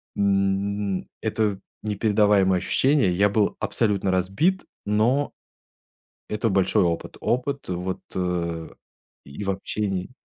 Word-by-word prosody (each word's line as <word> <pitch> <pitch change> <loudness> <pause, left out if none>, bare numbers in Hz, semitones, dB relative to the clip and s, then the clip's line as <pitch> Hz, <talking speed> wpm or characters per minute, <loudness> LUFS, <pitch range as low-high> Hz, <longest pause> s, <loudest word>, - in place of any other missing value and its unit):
М, 100 0 0 0.2
это 105 -3 0 0.2
непередаваемое 105 -3 +3
ощущение. 135 -6 +3
Я 100 +3 +4
был 100 0 +1
абсолютно 100 -4 0
разбит, 100 - +1 0.2
но, 115 +7 +2 1.0
это 110 +2 0
большой 95 -2 +3
опыт. 85 -1 -2
Опыт, 135 +2 -1
вот, 90 +1 -3 0.2
э, 85 -3 -2 0.6
и 70 +8 -8
в 100 - 0
общении 95 0 -2
100 Hz, 105 wpm, -24 LUFS, 95-105 Hz, 1.0 s, Я